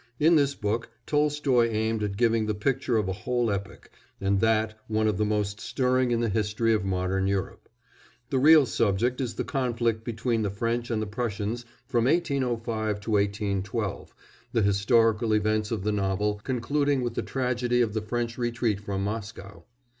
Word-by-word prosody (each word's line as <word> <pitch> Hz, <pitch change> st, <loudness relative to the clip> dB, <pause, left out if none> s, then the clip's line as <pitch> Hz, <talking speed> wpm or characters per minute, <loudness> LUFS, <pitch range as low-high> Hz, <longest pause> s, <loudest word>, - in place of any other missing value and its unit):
In 165 Hz, +3 st, +5 dB
this 140 Hz, -2 st, +2 dB
book 110 Hz, +3 st, -2 dB, 0.2 s
Tolstoy 145 Hz, -5 st, +2 dB
aimed 110 Hz, 0 st, -1 dB
at 100 Hz, -2 st, -2 dB
giving 115 Hz, -2 st, +2 dB
the 105 Hz, -, -1 dB
picture 125 Hz, +2 st, 0 dB
of 105 Hz, -3 st, 0 dB
a 95 Hz, -, -1 dB
whole 120 Hz, +3 st, -1 dB
epoch, 100 Hz, -1 st, -6 dB, 0.3 s
and 100 Hz, 0 st, +1 dB
that 110 Hz, 0 st, +2 dB
one 110 Hz, 0 st, +1 dB
of 105 Hz, -3 st, 0 dB
the 105 Hz, -, +2 dB
most 105 Hz, -1 st, -1 dB
stirring 130 Hz, +1 st, +1 dB
in 120 Hz, -1 st, +1 dB
the 115 Hz, -, +1 dB
history 110 Hz, +2 st, +1 dB
of 105 Hz, -3 st, +1 dB
modern 95 Hz, 0 st, 0 dB
Europe; 100 Hz, -1 st, -3 dB, 0.6 s
the 135 Hz, -, +2 dB
real 155 Hz, +1 st, +7 dB
subject 115 Hz, +3 st, 0 dB
is 125 Hz, -3 st, -3 dB
the -, -, -2 dB
conflict 120 Hz, -5 st, -1 dB
between 115 Hz, 0 st, -1 dB
the 105 Hz, -, 0 dB
French 115 Hz, +4 st, -2 dB
and 110 Hz, -2 st, 0 dB
the -, -, -3 dB
Prussians 110 Hz, +1 st, -3 dB, 0.2 s
from 120 Hz, -3 st, +1 dB
1805 120 Hz, -, 0 dB
to 110 Hz, -, -5 dB
1812, 100 Hz, 0 st, -1 dB, 0.4 s
the 115 Hz, -, +2 dB
historical 110 Hz, +2 st, +3 dB
events 110 Hz, 0 st, +1 dB
of 110 Hz, -5 st, -3 dB
the 105 Hz, -, +1 dB
novel 105 Hz, +1 st, -1 dB
concluding 140 Hz, +2 st, 0 dB
with 120 Hz, -1 st, -2 dB
the -, -, -2 dB
tragedy 125 Hz, -1 st, -1 dB
of 115 Hz, -4 st, +1 dB
the 110 Hz, -, -1 dB
French 115 Hz, +2 st, -3 dB
retreat 115 Hz, -3 st, 0 dB
from 100 Hz, -1 st, -3 dB
Moscow. 100 Hz, -4 st, -6 dB
110 Hz, 175 wpm, -27 LUFS, 105-120 Hz, 0.6 s, real